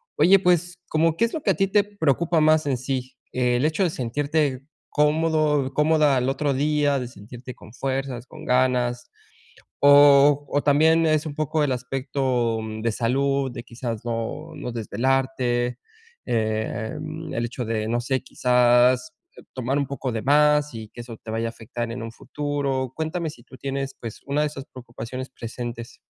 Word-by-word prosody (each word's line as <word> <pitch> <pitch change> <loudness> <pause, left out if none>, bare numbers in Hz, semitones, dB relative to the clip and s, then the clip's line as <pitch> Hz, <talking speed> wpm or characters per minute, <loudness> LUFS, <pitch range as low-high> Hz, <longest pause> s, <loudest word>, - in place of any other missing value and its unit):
Oye, 195 +2 +6
pues 175 -1 +1
como, 160 +1 +2
¿qué 230 - +4
es 230 - -5
lo 315 - -3
que - - -1
a - - 0
ti 195 -1 +2
te 205 +1 +3
preocupa 170 -4 +1
más 155 -1 +4
en 130 -3 +1
sí? 130 0 -4 0.2
El 125 +2 +1
hecho 160 +5 +1
de 175 - +2
sentirte 140 +1 -1 0.2
cómodo 150 -2 +2
cómoda 150 -1 +3
al 125 +1 +1
otro 140 +1 0
día, 145 0 +1
de 125 -2 -3
sentirte 120 +4 -10
con 110 - -15
fuerzas, 135 -2 -3
con - - -12
ganas, 125 -1 +1 0.7
o 145 0 +7
o 145 - 0
también 160 +3 +4
es 155 0 +2
un 155 - -4
poco 155 0 0
el 140 - +1
aspecto 125 -2 -1 0.2
de 115 0 0
salud 135 +3 0
de 120 -1 -7
quizás 115 -2 -6
no, 120 +8 -4
no 125 - -5
desvelarte. 125 +1 0 0.5
Eh, 110 0 -1
mm, 155 +1 -6
el 120 0 -1
hecho 120 +1 -5
de, 110 -1 -2
no 120 +1 +1
sé, 130 +2 -1
quizás 125 0 +3 0.4
tomar 130 +2 -1
un 140 - -1
poco 135 -2 -4
de 110 -1 -3
más 150 0 +3
y 110 -1 -7
que 120 - -9
eso 115 -2 -9
te 110 - -9
vaya 115 +1 -1
a - - -2
afectar 115 +1 -6
en 115 0 -5
un 115 - -6
futuro. 140 -1 -3
Cuéntame 160 +1 -2
si 120 - -16
tú 130 - -14
tienes, 135 0 -4
pues, 115 -2 -8
una 145 +2 +1
de 150 - +2
esas 140 -2 -8
preocupaciones 125 +1 -7
presentes. 120 0 -7
135 Hz, 175 wpm, -24 LUFS, 120-150 Hz, 0.7 s, o